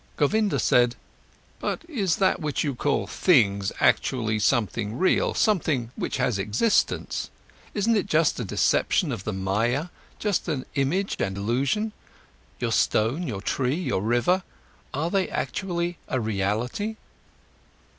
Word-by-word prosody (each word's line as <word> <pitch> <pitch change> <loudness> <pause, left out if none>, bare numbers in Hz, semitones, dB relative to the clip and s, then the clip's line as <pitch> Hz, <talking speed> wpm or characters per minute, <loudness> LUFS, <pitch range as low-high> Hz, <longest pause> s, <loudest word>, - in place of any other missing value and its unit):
Govinda 205 +2 +2
said: 120 0 +3 0.6
"But 330 - -3
is 205 - 0
that 190 - +2
what 150 -2 -1
you 145 -3 -1
call 140 +3 0
'things', 100 - +3
actually 110 -4 +2
something 110 -1 0
real, 190 - +2
something 155 - +1
which - - -3
has 115 -6 0
existence? 110 - 0 0.5
Isn't 220 +2 +2
it 200 -2 0
just 160 -6 +2
a - - -1
deception 140 - +1
of 115 -6 -5
the 110 - -1
Maya, 110 - 0 0.3
just 205 -5 -1
an 135 -4 -2
image 165 +9 0
and 95 0 -1
illusion? 135 - 0 0.7
Your 120 -2 -1
stone, 120 +10 +1
your 100 -6 -4
tree, 130 +4 0
your 165 - -1
river—are 145 - -2
they 195 -2 +1
actually 175 -2 -2
a 130 - -1
reality?" 110 - -1
135 Hz, 130 wpm, -25 LUFS, 110-180 Hz, 0.7 s, said